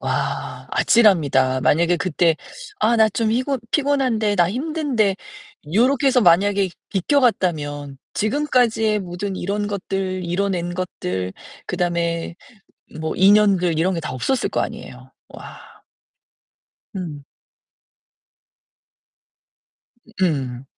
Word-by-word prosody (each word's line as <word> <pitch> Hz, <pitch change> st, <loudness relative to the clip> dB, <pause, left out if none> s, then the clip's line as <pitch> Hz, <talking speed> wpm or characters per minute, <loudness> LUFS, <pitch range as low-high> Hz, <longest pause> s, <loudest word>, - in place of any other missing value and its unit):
와, -, -, -3 dB
아찔합니다. 145 Hz, -, +3 dB
만약에 170 Hz, +6 st, +2 dB
그때 170 Hz, -2 st, +1 dB, 0.4 s
아 235 Hz, -, +2 dB
나 220 Hz, -1 st, +5 dB
좀 220 Hz, +2 st, -1 dB
피곤 260 Hz, +4 st, 0 dB
피곤한데, 260 Hz, -8 st, +1 dB
나 175 Hz, -2 st, +3 dB
힘든데, 255 Hz, -, -1 dB, 0.6 s
요렇게 260 Hz, +5 st, +3 dB
해서 260 Hz, -2 st, +4 dB
만약에 195 Hz, +1 st, +3 dB, 0.2 s
비껴갔다면 170 Hz, -, 0 dB, 0.2 s
지금까지의 225 Hz, -3 st, +1 dB
모든 185 Hz, +2 st, -5 dB
이런 205 Hz, +3 st, -2 dB
것들, 195 Hz, -2 st, -3 dB
이뤄낸 175 Hz, 0 st, -2 dB
것들, 95 Hz, -, -4 dB, 0.3 s
그다음에 170 Hz, -2 st, -2 dB, 0.6 s
뭐 160 Hz, 0 st, -3 dB
인연들 190 Hz, -4 st, +4 dB
이런 185 Hz, +3 st, +1 dB
게 165 Hz, -, -3 dB
다 150 Hz, -, -5 dB
없었을 185 Hz, -, -1 dB
거 -, -, -2 dB
아니에요. -, -, -8 dB, 0.2 s
와. -, -, -13 dB, 1.2 s
음. 155 Hz, -6 st, -6 dB, 3.0 s
음. 135 Hz, -7 st, -1 dB
190 Hz, 220 characters per minute, -21 LUFS, 170-220 Hz, 3.0 s, 나